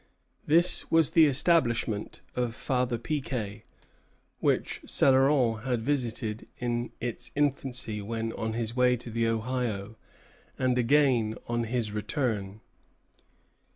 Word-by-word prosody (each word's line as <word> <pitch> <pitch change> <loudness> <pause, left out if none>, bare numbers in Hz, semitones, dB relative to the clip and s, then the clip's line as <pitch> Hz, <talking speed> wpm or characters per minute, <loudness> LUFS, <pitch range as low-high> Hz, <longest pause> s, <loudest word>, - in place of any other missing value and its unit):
This 170 +4 +3
was 165 -3 +3
the 165 -2 +6
establishment 125 -7 +1
of 120 -2 -1
Father 125 -2 -1
Piquet, 115 -6 -4 0.7
which - - 0
Céloron 130 -4 +3
had 125 -3 -1
visited 120 -5 -2
in 120 0 -2
its 120 -1 -4
infancy 130 -6 0
when 115 +2 -3
on 110 0 -3
his 115 0 -3
way 125 -1 +3
to 120 0 -9
the 115 0 0
Ohio, 115 -2 -2 0.6
and 130 -1 +1
again 120 -4 +3
on 120 0 -1
his 115 -2 -2
return. 105 -2 -2
120 Hz, 115 wpm, -28 LUFS, 110-130 Hz, 0.7 s, the